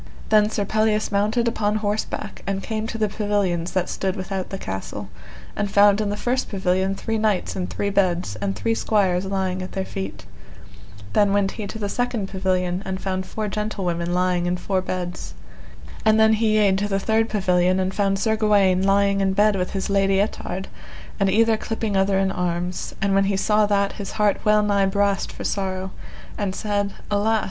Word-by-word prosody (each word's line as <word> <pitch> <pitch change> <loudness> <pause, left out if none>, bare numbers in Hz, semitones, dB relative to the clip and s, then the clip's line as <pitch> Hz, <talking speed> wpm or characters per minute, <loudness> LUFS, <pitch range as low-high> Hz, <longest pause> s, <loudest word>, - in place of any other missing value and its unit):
Then 215 -1 +5
Sir 205 -2 -1
Pelleas 215 +1 +1
mounted 215 +4 +1
upon 215 -2 0
horseback, 210 0 -3
and 195 0 -2
came 220 -1 -3
to 225 - -4
the 215 -1 +1
pavilions 200 -5 -1
that 180 -1 0
stood 190 -1 -2
without 190 0 -4
the 195 - -4
castle, 95 - -6 0.5
and 205 - -1
found 205 +1 +5
in 210 - -1
the 205 - -2
first 250 +4 -1
pavilion 190 0 0
three 225 +2 -2
knights 215 -3 0
in 180 -1 -2
three 200 - -2
beds, 180 - +1
and 100 -2 -2
three 225 - 0
squires 195 -5 +1
lying 190 -1 -1
at 185 - -7
their 190 -1 -2
feet. 95 - -6 0.9
Then 205 -1 +3
went 200 -1 +2
he 210 -3 -5
to 220 - -6
the 205 -2 -3
second 230 -2 -2
pavilion 185 -1 -1
and 190 -2 -4
found 185 -1 -3
four 215 -1 -3
gentlewomen 190 -5 -2
lying 180 -1 +1
in 180 0 0
four 185 +1 -1
beds. 180 -1 -5 0.7
And 220 0 +4
then 220 0 +6
he 220 0 +2
yede 195 -3 +3
to 205 - 0
the 195 -1 0
third 220 +3 +1
pavilion 185 -2 +2
and 185 0 -1
found 195 -1 +1
Sir 220 +2 +1
Gawaine 200 -4 +3
lying 200 0 +3
in 190 -1 +1
bed 205 +1 +3
with 180 -1 -2
his 195 -1 -2
Lady 195 -1 +2
Ettard, 190 -2 -2 0.5
and 195 -1 +3
either 225 +2 +3
clipping 220 -2 -3
other 195 0 +2
in 195 0 +1
arms, 180 0 -3
and 200 0 +2
when 195 0 +3
he 195 0 0
saw 210 +1 +3
that 200 -1 +1
his 200 -2 -7
heart 210 -2 +1
well 210 0 +4
nigh 200 -1 +2
brast 200 0 0
for - - -8
sorrow, 190 -1 -2 0.5
and 195 -2 -1
said: 205 -1 -1 0.2
Alas! 215 +2 +2
200 Hz, 195 wpm, -23 LUFS, 185-210 Hz, 0.9 s, then